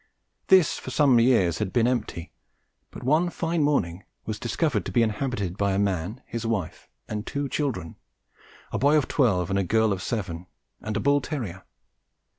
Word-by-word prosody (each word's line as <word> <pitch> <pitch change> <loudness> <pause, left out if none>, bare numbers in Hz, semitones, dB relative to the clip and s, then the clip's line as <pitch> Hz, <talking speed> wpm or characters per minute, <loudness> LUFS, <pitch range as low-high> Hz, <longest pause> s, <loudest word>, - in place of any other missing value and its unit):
This 190 -4 +5
for - - -8
some 130 -2 +4
years 115 -9 +3
had 105 -3 -2
been 120 -2 +2
empty, 120 -9 -2 0.6
but - - -10
one 155 +7 +3
fine 170 -1 -1
morning 100 - 0 0.2
was 110 -1 -4
discovered 120 - 0
to - - -4
be 115 +5 +3
inhabited 105 -4 -2
by 100 -1 +1
a - - 0
man, 100 - -1
his 115 0 -5
wife 110 -8 -3 0.2
and 105 -1 -4
two 140 +3 -3
children 125 - -3 0.7
a - - -2
boy 145 +3 +4
of 145 - +1
twelve 95 - +1
and 100 - +2
a - - +1
girl 110 +2 +2
of 95 - -5
seven 90 -6 -4 0.3
and 105 -1 -3
a - - 0
bull 140 +5 +3
terrier. 110 - -5
115 Hz, 180 wpm, -25 LUFS, 95-140 Hz, 0.7 s, This